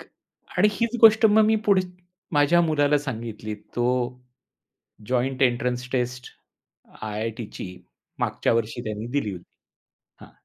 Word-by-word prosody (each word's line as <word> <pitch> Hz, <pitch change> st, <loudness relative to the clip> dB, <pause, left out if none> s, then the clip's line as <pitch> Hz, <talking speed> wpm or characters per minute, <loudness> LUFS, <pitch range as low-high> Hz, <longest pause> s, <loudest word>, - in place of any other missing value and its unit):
ख -, -, -12 dB, 0.5 s
आणि 210 Hz, -, +6 dB
हीच 230 Hz, +4 st, -1 dB
गोष्ट 220 Hz, 0 st, +7 dB
मग 215 Hz, 0 st, +5 dB
मी 220 Hz, +1 st, +3 dB
पुढच 185 Hz, -2 st, +4 dB, 0.5 s
माझ्या 145 Hz, +3 st, +4 dB
मुलाला 150 Hz, -2 st, +2 dB
सांगितली. 115 Hz, -5 st, -5 dB
तो 120 Hz, +3 st, -4 dB, 1.2 s
जॉइंट 130 Hz, +2 st, 0 dB
एन्ट्रन्स 125 Hz, 0 st, 0 dB
टेस्ट, 125 Hz, 0 st, -2 dB, 0.7 s
आय-आय-टीची 110 Hz, -3 st, -5 dB, 0.4 s
मागच्या -, -, 0 dB
वर्षी 115 Hz, +1 st, -1 dB
त्यानी 110 Hz, +1 st, -4 dB
दिली 105 Hz, -7 st, -3 dB
होती 90 Hz, -2 st, -11 dB, 0.7 s
हां. -, -, -17 dB
125 Hz, 120 wpm, -24 LUFS, 115-160 Hz, 1.2 s, गोष्ट